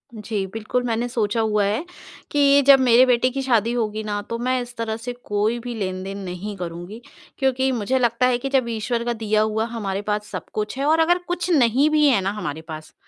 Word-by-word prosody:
जी, 210 Hz, -2 st, -3 dB
बिल्कुल 225 Hz, +3 st, -2 dB
मैंने 235 Hz, 0 st, -1 dB
सोचा 225 Hz, -2 st, 0 dB
हुआ 210 Hz, -2 st, +1 dB
है 215 Hz, +11 st, -1 dB, 0.5 s
कि 285 Hz, -1 st, +5 dB
जब 275 Hz, -1 st, +9 dB
मेरे 250 Hz, 0 st, +6 dB
बेटे 250 Hz, 0 st, +3 dB
की 270 Hz, +2 st, -3 dB
शादी 235 Hz, -4 st, +2 dB
होगी 220 Hz, -2 st, -2 dB
ना 205 Hz, -1 st, -3 dB
तो 230 Hz, -, -2 dB
मैं 255 Hz, +1 st, 0 dB
इस 245 Hz, 0 st, -9 dB
तरह 225 Hz, -1 st, -2 dB
से 240 Hz, +2 st, -6 dB
कोई 210 Hz, +3 st, 0 dB
भी 240 Hz, +1 st, -6 dB
लेन-देन 190 Hz, -1 st, -4 dB
नहीं 190 Hz, +3 st, -6 dB
करूँगी। 175 Hz, +5 st, -7 dB, 0.4 s
क्योंकि 265 Hz, 0 st, +1 dB
मुझे 250 Hz, +2 st, 0 dB
लगता 240 Hz, 0 st, +2 dB
है 250 Hz, -1 st, +2 dB
कि 270 Hz, +3 st, -4 dB
जब 265 Hz, -3 st, +1 dB
ईश्वर 230 Hz, +1 st, -2 dB
का 240 Hz, -, 0 dB
दिया 215 Hz, -1 st, 0 dB
हुआ 220 Hz, +1 st, 0 dB
हमारे 205 Hz, -4 st, -4 dB
पास 210 Hz, 0 st, -1 dB
सब -, -, -5 dB
कुछ 210 Hz, +3 st, -3 dB
है 275 Hz, -, -1 dB
और 315 Hz, +2 st, +3 dB
अगर 340 Hz, +2 st, +4 dB
कुछ 355 Hz, +1 st, -2 dB
नहीं 270 Hz, -1 st, +4 dB
भी 305 Hz, -1 st, +3 dB
है 255 Hz, -7 st, +4 dB
ना 190 Hz, +1 st, -1 dB
हमारे 160 Hz, -7 st, -5 dB
पास 155 Hz, -1 st, -9 dB
230 Hz, 220 wpm, -22 LUFS, 210-255 Hz, 0.5 s, जब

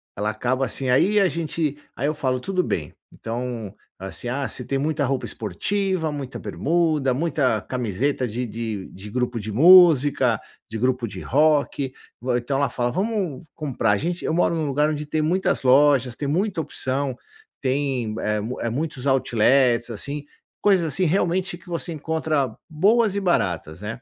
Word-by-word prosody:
ela 105 Hz, +2 st, -1 dB
acaba 130 Hz, +4 st, 0 dB
assim 130 Hz, +1 st, -2 dB
aí 205 Hz, +11 st, +4 dB
a 190 Hz, -2 st, +4 dB
gente, 155 Hz, -3 st, -2 dB, 0.2 s
aí 140 Hz, -, -1 dB
eu 155 Hz, -, +1 dB
falo: 130 Hz, -3 st, 0 dB
"tudo 185 Hz, +5 st, -1 dB
bem", 75 Hz, -4 st, -3 dB, 0.2 s
então 115 Hz, -3 st, -5 dB, 0.3 s
assim, 95 Hz, +5 st, -6 dB
ah, 135 Hz, +2 st, -1 dB
se 125 Hz, -, -4 dB
tem 135 Hz, +2 st, -1 dB
muita 150 Hz, 0 st, 0 dB
roupa 130 Hz, -2 st, -1 dB
esportiva, 160 Hz, -, -2 dB
muita 140 Hz, -3 st, -6 dB
bermuda, 155 Hz, -5 st, +1 dB
muita 140 Hz, -7 st, +1 dB
camiseta 125 Hz, +2 st, -1 dB
de 120 Hz, +3 st, -3 dB
de 110 Hz, -3 st, -5 dB
de 100 Hz, +3 st, -10 dB
grupo 125 Hz, -1 st, -1 dB
de 110 Hz, 0 st, -5 dB
música, 145 Hz, -, +6 dB, 0.3 s
de 110 Hz, -, -4 dB
grupo 125 Hz, -1 st, 0 dB
de 95 Hz, -2 st, -8 dB
rock 145 Hz, -2 st, +2 dB, 0.3 s
vo, 125 Hz, 0 st, -1 dB
então 125 Hz, +3 st, -1 dB
ela 140 Hz, -, +1 dB
fala: 120 Hz, -1 st, -1 dB
"vamos 190 Hz, -, -2 dB
comprar". 130 Hz, -8 st, -1 dB
A 100 Hz, -, +3 dB
gente 175 Hz, -, -3 dB
eu 160 Hz, -, 0 dB
moro 170 Hz, 0 st, +2 dB
num 160 Hz, -2 st, -1 dB
lugar 150 Hz, +2 st, +2 dB
onde 150 Hz, -1 st, -3 dB
tem 155 Hz, +1 st, -1 dB
muitas 180 Hz, +5 st, +1 dB
lojas, 130 Hz, -2 st, +4 dB
tem 145 Hz, -, -4 dB
muita 180 Hz, +3 st, 0 dB
opção, 135 Hz, -2 st, -2 dB, 0.5 s
tem 130 Hz, -5 st, -1 dB
é 105 Hz, 0 st, 0 dB
mu 115 Hz, +5 st, -5 dB
é 115 Hz, -, -1 dB
muitos 140 Hz, -1 st, -3 dB
outlets 125 Hz, -1 st, +3 dB
assim, 140 Hz, +7 st, -3 dB, 0.4 s
coisas 190 Hz, -5 st, +4 dB
assim 175 Hz, +6 st, 0 dB
realmente 180 Hz, +1 st, 0 dB
que 170 Hz, -, -22 dB
você 170 Hz, 0 st, -3 dB
encontra 155 Hz, -4 st, -1 dB, 0.2 s
boas 205 Hz, +6 st, +3 dB
e 200 Hz, -, 0 dB
baratas, 90 Hz, -, 0 dB
né? 115 Hz, +3 st, -6 dB
135 Hz, 170 wpm, -23 LUFS, 120-160 Hz, 0.5 s, música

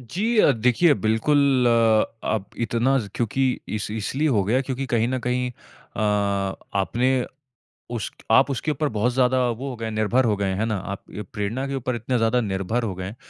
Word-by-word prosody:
जी 205 Hz, -, -1 dB
अ, 210 Hz, -, +6 dB
देखिए 125 Hz, +7 st, +3 dB
बिल्कुल, 130 Hz, +3 st, +2 dB, 0.6 s
आप 105 Hz, -2 st, -2 dB, 0.2 s
इतना 125 Hz, +5 st, +2 dB, 0.2 s
क्योंकि 120 Hz, +3 st, 0 dB, 0.3 s
इस 105 Hz, -, -5 dB
इसलिए 120 Hz, +8 st, -1 dB
हो 110 Hz, -8 st, +2 dB
गया 120 Hz, +7 st, +2 dB
क्योंकि 135 Hz, 0 st, -3 dB
कहीं 115 Hz, -1 st, +1 dB
न 130 Hz, 0 st, -1 dB
कहीं 125 Hz, +1 st, -1 dB
अ, 120 Hz, -, -13 dB, 0.8 s
आपने 125 Hz, +6 st, +1 dB, 0.7 s
उस 115 Hz, -3 st, -3 dB, 0.2 s
आप 135 Hz, +5 st, +5 dB
उसके 140 Hz, +4 st, -1 dB
ऊपर 150 Hz, +1 st, -1 dB
बहुत 120 Hz, +4 st, +1 dB
ज़्यादा 130 Hz, 0 st, +2 dB
वो 125 Hz, +4 st, -4 dB
हो 130 Hz, -, -5 dB
गए 115 Hz, -1 st, -6 dB
हैं 110 Hz, -, -3 dB
निर्भर 110 Hz, +4 st, +1 dB
हो 110 Hz, -3 st, +2 dB
गए 100 Hz, -, -1 dB
हैं, 95 Hz, -, -1 dB
है 110 Hz, -, +1 dB
ना? 110 Hz, -1 st, -1 dB
आप 100 Hz, +1 st, -6 dB
ये 105 Hz, -, -5 dB
प्रेरणा 105 Hz, +6 st, -2 dB
के 140 Hz, -, -3 dB
ऊपर 130 Hz, -1 st, -2 dB
इतने 120 Hz, +2 st, -1 dB
ज़्यादा 115 Hz, +2 st, +2 dB
निर्भर 100 Hz, +3 st, -2 dB
हो 105 Hz, -4 st, -2 dB
गए 90 Hz, 0 st, -5 dB
हैं, 100 Hz, -, -7 dB
120 Hz, 200 wpm, -23 LUFS, 110-130 Hz, 0.8 s, अ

